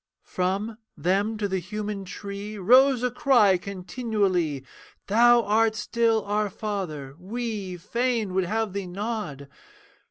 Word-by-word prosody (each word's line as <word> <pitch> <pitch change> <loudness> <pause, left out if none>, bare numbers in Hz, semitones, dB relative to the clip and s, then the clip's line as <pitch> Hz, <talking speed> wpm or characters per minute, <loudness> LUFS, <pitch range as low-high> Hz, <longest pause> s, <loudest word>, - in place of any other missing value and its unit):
From, 200 +5 -2 0.2
them 200 +5 0
to 210 -1 -1
the 190 -1 -1
human 205 +2 -5
tree 200 +2 -7
Rose 250 +6 +5
a 250 - +1
cry 240 -7 +4
continually, 185 - -1 0.4
'Thou 235 +3 +5
art 220 +1 +2
still, 225 0 +1
our 210 0 0
Father, 180 -10 -4
we 205 -2 -4
Fain 230 +1 -1
would 190 -1 +1
have 220 +1 -1
thee 200 -2 -3
nod. 190 - -4
205 Hz, 125 wpm, -26 LUFS, 185-225 Hz, 0.4 s, Rose